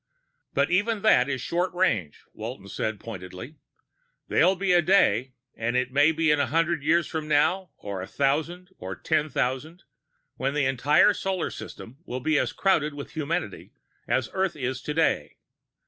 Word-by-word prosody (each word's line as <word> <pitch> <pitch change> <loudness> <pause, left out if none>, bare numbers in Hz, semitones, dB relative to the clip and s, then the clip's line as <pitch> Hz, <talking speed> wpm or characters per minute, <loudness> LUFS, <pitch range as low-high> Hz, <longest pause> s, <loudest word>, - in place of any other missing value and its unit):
"But 140 +4 +2
even 205 +3 +1
that 140 -12 +5
is 135 -3 -2
short 175 +5 -1
range," 110 - 0
Walton 110 -2 -7
said 110 +1 -3
pointedly. 110 - -9 0.7
"There'll 190 - +4
be 190 0 +1
a 175 - +6
day 135 - +3 0.2
it 125 +2 -1
may 145 +3 +5
be 160 0 +2
a 145 -1 +3
hundred 165 +3 +1
years 165 +3 +3
from 155 -2 -4
now, 175 +5 +2
or 100 -2 -5
a 95 - -6
thousand, 160 +7 -1
or - - -5
ten 155 -1 0
thousand 140 +7 -2 0.5
when 135 +2 -1
the 150 -2 +2
entire 135 - +4
solar 190 -3 -2
system 125 +5 -10
will 130 -7 -5
be 155 +3 +2
as - - 0
crowded 155 -7 +1
with 140 - -8
humanity 155 - -4 0.3
as 130 -3 +1
Earth 190 -2 0
is 130 -2 -3
today. 160 +2 0
150 Hz, 160 wpm, -26 LUFS, 125-175 Hz, 0.7 s, a